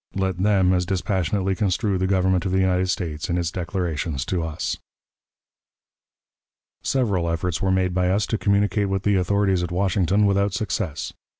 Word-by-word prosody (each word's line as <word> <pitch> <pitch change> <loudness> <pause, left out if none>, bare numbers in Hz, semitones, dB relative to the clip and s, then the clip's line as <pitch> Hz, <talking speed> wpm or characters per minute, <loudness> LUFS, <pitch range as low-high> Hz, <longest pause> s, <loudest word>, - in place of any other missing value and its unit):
Let 95 -2 -1
them 95 -2 +3
as 90 -1 0
dispassionately 95 0 0
construe 95 +1 0
the 95 - +1
Government 95 -2 +2
of 95 - -2
the 95 - +1
United 95 0 +1
States 80 -5 -3
in 85 - 0
its 85 -2 -1
declarations 85 -5 -3
to 90 -2 -1
us. 80 -1 -3 2.1
Several 100 -10 0
efforts 85 +1 -2
were 95 - +1
made 95 -1 +1
by 90 0 +1
us 100 +2 +1
to 110 - -2
communicate 100 0 +1
with 95 0 -1
the 105 - +2
authorities 95 0 +2
at 90 -1 -3
Washington 95 +2 +2
without 100 0 +1
success. 90 -7 -3
95 Hz, 165 wpm, -23 LUFS, 90-100 Hz, 2.1 s, them